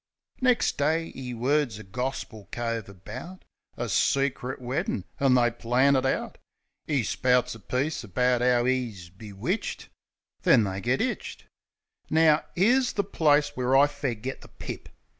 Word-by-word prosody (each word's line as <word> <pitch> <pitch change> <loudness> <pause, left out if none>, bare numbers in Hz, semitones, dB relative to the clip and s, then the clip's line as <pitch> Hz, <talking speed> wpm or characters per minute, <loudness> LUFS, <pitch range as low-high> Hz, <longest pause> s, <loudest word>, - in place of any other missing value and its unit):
Nex' 250 -2 +3
day 160 +3 0
'e 125 -2 -6
words 130 -1 +1
a 110 - -9
gorspil 110 -2 -5
cove 115 -3 -3
about 115 - -10 0.3
A - - -2
secrit 135 -2 0
weddin'; 160 - -2 0.2
an' 135 -3 +4
they 120 -1 +4
plan 125 +4 +2
it 130 0 +2
out. - - -2 0.5
'E 145 -6 +1
spouts 125 +2 +1
a 115 - -11
piece 130 - -2
about 125 +4 +1
'ow 125 -1 +3
'e's 115 -10 -2
bewitched: 100 +1 -4 0.5
Then 115 - +5
they 95 -1 -3
git 125 +4 +1
'itched... 250 - -4 0.6
Now, 155 -1 +4
'ere's 245 +7 +3
the 200 - 0
place 150 -4 +3
where 130 -1 +1
I 140 - +7
fair 140 -4 -3
git 130 +5 -6
the - - -13
pip - - -8
130 Hz, 150 wpm, -27 LUFS, 115-145 Hz, 0.6 s, I